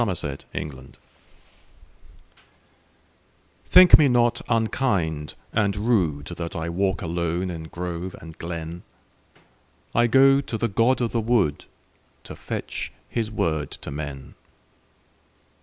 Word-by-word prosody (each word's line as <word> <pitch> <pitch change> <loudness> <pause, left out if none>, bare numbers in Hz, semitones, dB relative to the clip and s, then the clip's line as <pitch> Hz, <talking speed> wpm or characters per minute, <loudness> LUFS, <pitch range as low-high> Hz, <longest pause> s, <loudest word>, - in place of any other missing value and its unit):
The 115 -5 +1 0.6
Apology 65 -2 -13 2.7
THINK 180 0 +8
me 150 - +5
not 120 -1 +2
unkind 100 - 0 0.2
and 105 -2 +1
rudeThat 85 -7 -1
I 80 +1 -3
walk 95 +2 -1
alone 85 +2 -2
in 80 -2 -6
grove 90 +2 -5
and 80 -1 -11
glen;I 85 +7 -6
go 135 +3 +5
to 120 -5 -4
the 115 - 0
god 115 +6 +2
of 120 - 0
the 115 - 0
woodTo 110 -10 -3
fetch - - -5 0.2
his 115 -2 -2
word 80 -8 -1
to - - -8
men. 70 -2 -7
95 Hz, 105 wpm, -24 LUFS, 80-115 Hz, 2.7 s, THINK